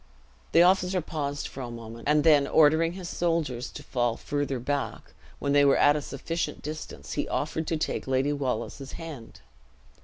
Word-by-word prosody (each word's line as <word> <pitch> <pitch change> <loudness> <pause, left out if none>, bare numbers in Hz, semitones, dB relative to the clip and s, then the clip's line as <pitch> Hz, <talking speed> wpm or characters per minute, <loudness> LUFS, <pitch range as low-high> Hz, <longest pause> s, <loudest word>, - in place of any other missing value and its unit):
The 170 - +7
officer 185 0 +3
paused 145 -3 -3
for 135 - -8
a 125 - -5
moment, 115 0 -8
and 150 0 +4
then, 150 -3 +5
ordering 160 +2 +4
his 185 -1 -7
soldiers 165 -9 -1
to 145 - -9
fall 120 -4 0
further 145 -2 -2
back, 140 +4 -3 0.2
when 140 0 -1
they 145 0 +6
were 140 -1 +5
at 145 0 +5
a 150 - -1
sufficient 150 +2 -4
distance, 155 +1 -6
he - - -1
offered 160 -1 -2
to 165 - 0
take 155 - -2
Lady 135 +2 +1
Wallace's 135 0 -3
hand. 150 -9 -9
145 Hz, 175 wpm, -27 LUFS, 135-160 Hz, 0.2 s, The